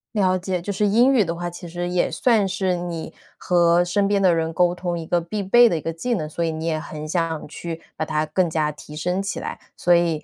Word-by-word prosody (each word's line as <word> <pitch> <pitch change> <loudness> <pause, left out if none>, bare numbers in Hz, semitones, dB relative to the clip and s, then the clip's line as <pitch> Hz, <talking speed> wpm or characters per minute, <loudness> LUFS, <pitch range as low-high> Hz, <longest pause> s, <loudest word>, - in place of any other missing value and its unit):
了 185 -2 +3
解， 180 -1 -3
就 200 - -4
是 205 +1 +1
英 240 +6 +4
语 230 -6 +4
的 170 -1 -3
话， 175 +1 -4
其 175 0 -9
实 175 +1 -4
也 180 0 +1
算 225 -5 +2
是 190 -1 0
你 175 -2 -5 0.2
和 175 -1 +3
身 195 +3 +1
边 200 -1 +2
的 180 -3 +5
人 165 0 -1
沟 175 0 +3
通 175 -1 -3
一 165 - -5
个 175 - +1
必 200 +4 -4
备 240 +5 +6
的 170 - 0
一 - - -5
个 165 - -3
技 240 +10 -2
能， 155 -8 -2
所 170 +2 -3
以 165 - 0
你 160 +1 -5
也 160 -2 0
很 155 0 -7
想 165 -1 -2
去 165 +2 -7
把 155 - -2
它 155 0 0
更 170 +3 +1
加 155 -1 0
提 150 +1 -12
升 180 +5 -1
起 195 - -3
来。 - - -6 0.2
所 175 - +3
以， 165 -3 +2
175 Hz, 275 characters per minute, -22 LUFS, 165-190 Hz, 0.2 s, 备